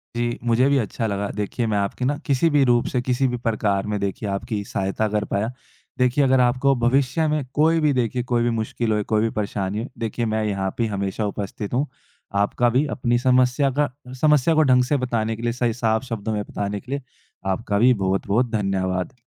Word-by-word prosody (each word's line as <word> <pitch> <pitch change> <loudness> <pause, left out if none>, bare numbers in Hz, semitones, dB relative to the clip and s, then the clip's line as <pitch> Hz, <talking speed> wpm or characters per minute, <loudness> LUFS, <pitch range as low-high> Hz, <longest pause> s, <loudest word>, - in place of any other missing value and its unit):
जी, 120 0 -1
मुझे 120 +2 +3
भी 140 - +3
अच्छा 115 -1 -1
लगा। 100 -1 -2
देखिए 105 +3 -2
मैं - - +2
आपकी 100 +5 -1
ना 145 +2 0
किसी 145 +3 +2
भी 145 -2 +4
रूप 120 -1 +3
से, 125 - +1
किसी 125 +2 +1
भी 125 -1 -2
प्रकार 105 -3 0
में 105 -1 -1
देखिए 100 +1 -3
आपकी 100 +2 -3
सहायता 100 +3 -1
कर 105 0 -1
पाया। 105 +4 0 0.5
देखिए 125 +3 +3
अगर 130 -1 +4
आपको 125 +2 +3
भविष्य 135 +5 +2
में 150 -1 0
कोई 160 +2 +3
भी 150 -2 +2
देखिए 125 -1 0
कोई 120 -1 0
भी 120 - +2
मुश्किल 110 +1 -2
होए, 105 -1 +1
कोई 110 +1 +1
भी 115 - +1
परेशानी 100 -1 -2
हो, 130 - -7
देखिए 115 +1 -2
मैं 110 0 0
यहाँ 95 -2 -2
पे 115 - +1
हमेशा 100 +2 -2
उपस्थित 100 +1 -5
हूँ। 140 +4 +1 0.6
आपका 120 +4 +1
भी 130 +6 +2
अपनी 120 -2 +1
समस्या 130 +2 +3
का 150 - +3 0.3
समस्या 150 +1 +4
को 155 - +5
ढंग 130 -3 +4
से 140 +3 +1
बताने 115 -3 -1
के 115 - -9
लिए, 120 0 0
सही 120 -2 0
साफ 110 -1 0
शब्दों 115 -4 -4
में 105 -1 -1
बताने 100 0 -4
के 130 +5 -12
लिए 140 0 -2 0.5
आपका 100 +1 -1
भी 125 +3 +6
बहुत-बहुत 100 +5 +1
धन्यवाद। 95 -1 -1
120 Hz, 210 wpm, -23 LUFS, 105-130 Hz, 0.6 s, भी